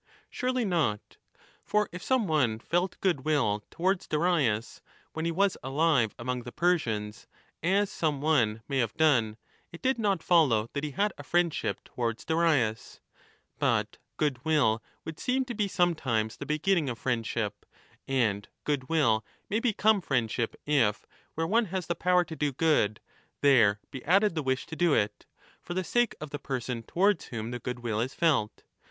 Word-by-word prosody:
Surely 255 -1 -1
not! 155 - -1 0.5
For 210 0 +1
if 180 - -7
some 260 0 +1
one 145 - +1
felt 175 +10 -1
goodwill 140 - +1
towards 185 +2 -1
Darius, 150 -9 0 0.3
when 160 +1 -3
5 - - +1
he - - 0
was 195 +3 +1
alive 135 -4 +1
among 125 +1 -3
the 120 0 -9
Persians, 115 -13 -1 0.3
as 195 +4 +2
some 150 -4 -1
one 120 -8 +1
may 135 -2 -1
have 115 -4 -1
done, 120 -9 +3 0.3
it 170 - -10
did 260 -1 +1
not 200 -6 0
follow 125 -11 +3
that 140 - -3
he 150 - -2
had 200 +7 0
a - - -7
friendship 175 +1 0
towards 115 -2 -4
Darius); 155 -9 +1 0.6
but - - +1 0.2
goodwill 140 -5 +1 0.2
would 160 -1 -7
seem 260 0 0
to 245 - -5
be 210 -2 0
sometimes 130 - 0
the - - -7
beginning 155 0 +1
of 120 - -4
friendship, 115 -4 -2 0.4
and 110 -7 0
goodwill 135 -5 +1 0.3
may 215 - +2
become 220 -3 +2
friend 120 -9 0
ship 115 -2 -2
if, 130 -8 +2 0.3
where 165 - 0
one 225 +7 +2
has 185 -2 -3
the 170 - -1
power 180 +1 +2
to 160 - -7
do 150 -2 0
good, 135 -8 +2 0.4
there 115 -8 +5
be 130 - -7
added 195 +4 +4
the 160 - -1
wish 130 -2 -1
to 160 - -8
do 170 -2 +3
it 105 0 -1 0.3
for 175 - -6
the 185 - 0
sake 240 +5 +1
of 155 -1 -7
the 145 - -4
person 125 -2 -3
towards 185 - +1
swhom 115 0 -5
the 125 - -4
goodwill 120 -3 -3
is 130 +3 -3
felt. 140 -11 +1
150 Hz, 170 wpm, -28 LUFS, 120-175 Hz, 0.6 s, there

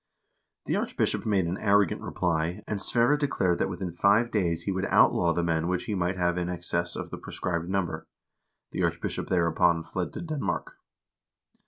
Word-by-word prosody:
The - - 0
archbishop - - -1
made 100 -4 +2
an 85 +3 -3
arrogant 100 -3 +3
reply, 85 0 -1
and 105 -2 -2
Sverre 120 +5 +3
declared 95 -12 +1
that - - +1
within 90 -1 -4
five 100 +7 +3
days 85 -5 0
he 100 - -1
would 95 0 -1
outlaw 85 -1 +4
the 85 +1 0
men 85 -1 0
which 90 0 0
he 110 - -3
might 90 -1 -1
have 90 0 +1
in 90 0 -2
excess 85 -1 -2
of - - -6
the - - -6
prescribed 85 -1 -3
number. 90 -5 -2 0.6
The - - -3
archbishop - - -1
thereupon 85 -1 +2
fled 90 +1 -4
to - - -5
Denmark. 150 - -3
90 Hz, 175 wpm, -27 LUFS, 85-100 Hz, 0.6 s, outlaw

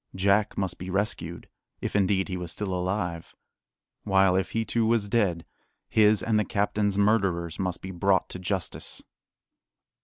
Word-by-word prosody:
Jack 100 +2 +2
must 95 -3 -2
be 90 - -6
rescued, 100 +3 -2 0.3
if - - -4
indeed 95 -1 +2
he 95 - -4
was 90 -2 -4
still 100 -3 -3
alive; 90 -2 -3 0.7
while, 95 -2 +3
if 95 -2 0
he 115 0 -1
too 115 +2 0
was 115 -3 +2
dead, 100 -7 +1 0.4
his 105 -2 +4
and 110 -1 +2
the - - +2
captain's 105 -1 0
murderers 95 -6 +1
must 90 -2 -2
be 95 - -5
brought 95 +1 +2
to 90 - -7
justice. 95 -1 -4
95 Hz, 155 wpm, -27 LUFS, 90-105 Hz, 0.7 s, his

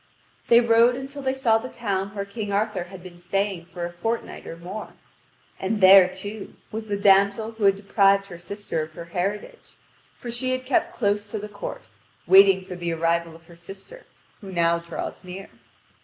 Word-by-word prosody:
They 235 0 +7
rode 235 +1 +4
until 270 +2 -7
they 265 -1 -1
saw 230 -4 +3
the 255 +3 -7
town 200 -4 -3
where 200 -1 -3
King 205 0 -5
Arthur 200 -3 -1
had 185 0 -12
been 175 -2 -12
staying 190 0 -2
for 175 -1 -6
a 175 - -6
fortnight 225 +7 -4
or 165 - -7
more. 185 +5 -8 0.7
And 205 +3 -1
there, 190 -1 +8
too, 205 +2 -8 0.2
was 220 0 -5
the 205 -1 -1
damsel 200 +2 +3
who 220 -2 -2
had 195 -1 +5
deprived 200 0 +3
her 175 -3 -11
sister 190 -2 -4
of 155 0 -7
her 170 - -8
heritage, 205 - -4 0.4
for 240 - -7
she 255 +2 -1
had 255 0 -3
kept 255 - 0
close 205 -2 0
to 215 - -4
the 210 0 -6
court, 205 -1 -7 0.4
waiting 190 0 +6
for 180 - -7
the 175 -1 -3
arrival 165 0 0
of 165 0 -17
her 170 - -16
sister, 195 - -12 0.3
who 195 -3 -10
now 170 -1 +2
draws 170 +2 -7
near. 185 +2 -9
200 Hz, 190 wpm, -24 LUFS, 180-220 Hz, 0.7 s, there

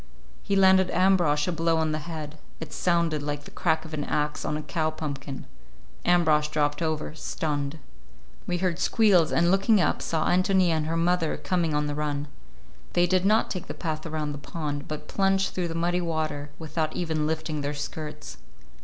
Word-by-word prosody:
He 200 - -1
landed 190 -1 +5
Ambrosch 175 -5 +3
a - - +1
blow 165 0 +1
on 160 -1 +1
the 155 - -1
head—it 155 0 -8
sounded 170 -4 +1
like 145 0 -3
the - - -12
crack 160 0 0
of 160 - -9
an 150 -1 -2
axe 150 +1 -1
on 150 - -1
a 155 - -5
cow 155 +1 -1
pumpkin. 140 -3 -6 0.6
Ambrosch 155 -4 +4
dropped 150 0 0
over, 155 -2 -2
stunned. 150 -2 -3 0.7
We 175 - 0
heard 180 -1 -1
squeals, 190 -7 +4
and 170 +1 +3
looking 195 +2 +4
up - - +1
saw 160 -2 0
Ántonia 185 0 +3
and 155 -2 0
her 165 +1 -1
mother 170 -1 +1
coming 170 -5 0
on 150 0 +1
the 145 - -2
run. 145 -1 -2 0.7
They 175 - +4
did 185 +1 +2
not 215 +2 +3
take 185 - -4
the - - -6
path 155 -2 -3
around 155 -2 -2
the 145 - -6
pond, 145 -1 -4
but 155 -1 -6
plunged 195 0 +1
through 180 -2 -1
the 165 - -5
muddy 175 +2 +1
water, 155 -3 -2
without 160 -1 -3
even 160 -3 -1
lifting 155 -1 -2
their 145 +1 -2
skirts. 145 - -6
160 Hz, 185 wpm, -26 LUFS, 150-175 Hz, 0.7 s, landed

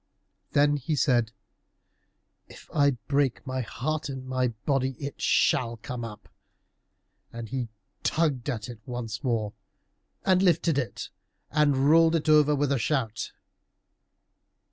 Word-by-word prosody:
Then 145 +1 +4
he 145 +3 -2
said, 120 -7 +2 1.2
"If - - -15
I 140 -3 +3
break 140 -3 +1
my 130 -1 -2
heart 150 +5 -3
in 130 -1 -6
my 130 -1 +1
body 130 +3 -1
it 140 0 -6
shall 115 -2 +2
come 120 +2 -6
up." 105 -2 -8 1.0
And 115 -1 -7
he 125 -3 -3 0.3
tugged 150 -5 0
at 115 -4 -3
it 120 -3 -9
once 120 -3 -5
more, 110 -5 -1 0.7
and 185 -1 +4
lifted 170 -5 +3
it, 125 - -4 0.4
and 145 -3 +3
rolled 165 0 +6
it 155 -1 -1
over 150 -1 +5
with 145 0 0
a 140 - +2
shout. 115 -3 -1
135 Hz, 130 wpm, -27 LUFS, 120-150 Hz, 1.2 s, rolled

